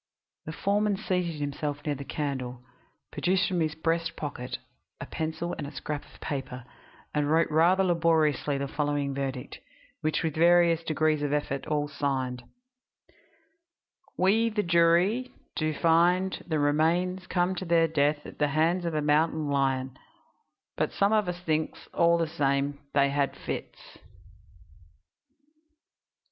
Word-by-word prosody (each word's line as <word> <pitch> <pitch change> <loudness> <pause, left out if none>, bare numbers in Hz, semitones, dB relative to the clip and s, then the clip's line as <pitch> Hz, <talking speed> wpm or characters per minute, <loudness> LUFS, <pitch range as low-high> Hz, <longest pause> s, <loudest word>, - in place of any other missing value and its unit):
The - - -3
foreman 200 +4 0
seated 180 -6 -2
himself 145 0 -3
near 150 - 0
the 140 0 -6
candle, 130 -4 -4 0.5
produced 185 +1 +1
from 180 -2 -1
his 155 -2 0
breast 165 +1 -1
pocket 130 -4 -5 0.4
a - - -5
pencil 160 +2 -3
and 145 -2 -6
scrap 150 0 -5
of - - -18
paper, 135 -4 -5 0.5
and 150 -1 0
wrote 160 +1 +3
rather 175 +5 +4
laboriously 160 -5 +2
the 140 0 -2
following 145 -1 -1
verdict, 135 -2 -4 0.4
which 155 0 -1
with 160 -2 -1
various 170 0 +4
degrees 155 -1 +1
of 145 -1 -1
effort 140 -2 -2
all 150 -1 0
signed: 135 -4 -2 1.8
"We, 220 +5 +3
the 210 -1 -1
jury, 175 +8 +3 0.2
do 155 0 0
find 175 +4 +3
that - - -8
the 160 - +1
remains 170 +5 +1
come 180 +1 +1
to 185 - -4
their 165 -1 +4
death 150 -1 +1
at - - -11
the 150 - +3
hands 165 +5 +1
of 165 -2 -2
a 150 - 0
mountain 150 0 +2
lion, 135 -2 0 0.8
but - - 0
some 200 +2 +2
of 210 -3 +2
us 180 0 -5
thinks, 160 -2 -2
all 170 0 +4
the 165 - +1
same, 140 -2 0 0.2
they 140 -1 +4
had 140 -1 0
fits." - - -7
155 Hz, 145 wpm, -28 LUFS, 145-170 Hz, 1.8 s, rather